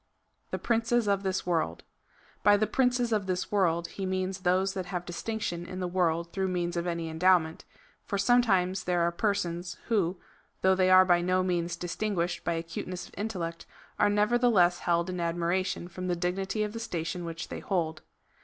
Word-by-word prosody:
The -, -, -2 dB
princes 230 Hz, -1 st, +1 dB
of 200 Hz, -1 st, +2 dB
this 190 Hz, -1 st, -2 dB
world. 165 Hz, -, -1 dB, 0.6 s
By 205 Hz, 0 st, +6 dB
the 215 Hz, -, +2 dB
princes 245 Hz, -1 st, +1 dB
of 205 Hz, -3 st, 0 dB
this 180 Hz, -1 st, -2 dB
world 170 Hz, -4 st, +2 dB
he 195 Hz, -, -5 dB
means 185 Hz, 0 st, -2 dB
those 185 Hz, +1 st, +1 dB
that 185 Hz, -2 st, -4 dB
have 180 Hz, -1 st, -4 dB
distinction 175 Hz, 0 st, -3 dB
in 185 Hz, +1 st, -7 dB
the 180 Hz, -, -1 dB
world 170 Hz, -2 st, 0 dB
through 190 Hz, -1 st, 0 dB
means 175 Hz, -1 st, -1 dB
of 170 Hz, +1 st, -2 dB
any 170 Hz, -1 st, -2 dB
endowment, 160 Hz, 0 st, +2 dB, 0.4 s
for 200 Hz, -, -1 dB
sometimes 195 Hz, -5 st, +2 dB
there 175 Hz, -1 st, +1 dB
are 170 Hz, 0 st, +2 dB
persons, 175 Hz, -2 st, -2 dB
who, 190 Hz, -5 st, +1 dB, 0.4 s
though 190 Hz, 0 st, +5 dB
they 185 Hz, 0 st, +3 dB
are 185 Hz, 0 st, +8 dB
by 175 Hz, -1 st, +4 dB
no 185 Hz, +1 st, +2 dB
means 175 Hz, -1 st, -1 dB
distinguished 175 Hz, 0 st, -2 dB
by 170 Hz, -, 0 dB
acute 165 Hz, 0 st, -5 dB
ness 180 Hz, -1 st, -6 dB
of -, -, -20 dB
intellect, 180 Hz, -6 st, -4 dB, 0.3 s
are -, -, +4 dB
nevertheless 210 Hz, -4 st, +3 dB
held 170 Hz, 0 st, +1 dB
in 180 Hz, -1 st, -4 dB
admiration 175 Hz, +2 st, -1 dB
from 185 Hz, +1 st, -6 dB
the 175 Hz, -, +1 dB
dignity 190 Hz, +4 st, -1 dB
of 210 Hz, 0 st, -4 dB
the 230 Hz, -, -5 dB
station 175 Hz, -5 st, -3 dB
which 165 Hz, 0 st, -6 dB
they -, -, -5 dB
hold. 165 Hz, -5 st, -2 dB
185 Hz, 185 wpm, -29 LUFS, 170-200 Hz, 0.6 s, are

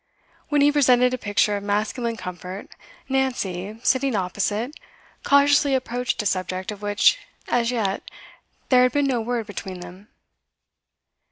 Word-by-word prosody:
When 295 Hz, -1 st, +2 dB
he 290 Hz, +1 st, +5 dB
presented 250 Hz, -3 st, +4 dB
a -, -, -1 dB
picture 205 Hz, 0 st, +1 dB
of -, -, -6 dB
masculine 215 Hz, +3 st, -1 dB
comfort, 180 Hz, +1 st, -7 dB, 0.4 s
Nancy, 220 Hz, -7 st, -2 dB
sitting 265 Hz, -2 st, +2 dB
opposite, 205 Hz, +7 st, -2 dB, 0.5 s
cautiously 280 Hz, 0 st, +4 dB
approached 250 Hz, -1 st, -2 dB
a -, -, -10 dB
subject 185 Hz, 0 st, -2 dB
of 205 Hz, -1 st, -9 dB
which 205 Hz, -, +3 dB, 0.3 s
as 235 Hz, -1 st, +1 dB
yet 210 Hz, -6 st, -1 dB, 0.7 s
there 255 Hz, -1 st, +6 dB
had 250 Hz, -1 st, +3 dB
been 285 Hz, -1 st, +2 dB
no 255 Hz, -4 st, 0 dB
word 235 Hz, 0 st, -2 dB
between 190 Hz, -3 st, -7 dB
them. 180 Hz, +3 st, -11 dB
225 Hz, 140 wpm, -23 LUFS, 200-255 Hz, 0.7 s, there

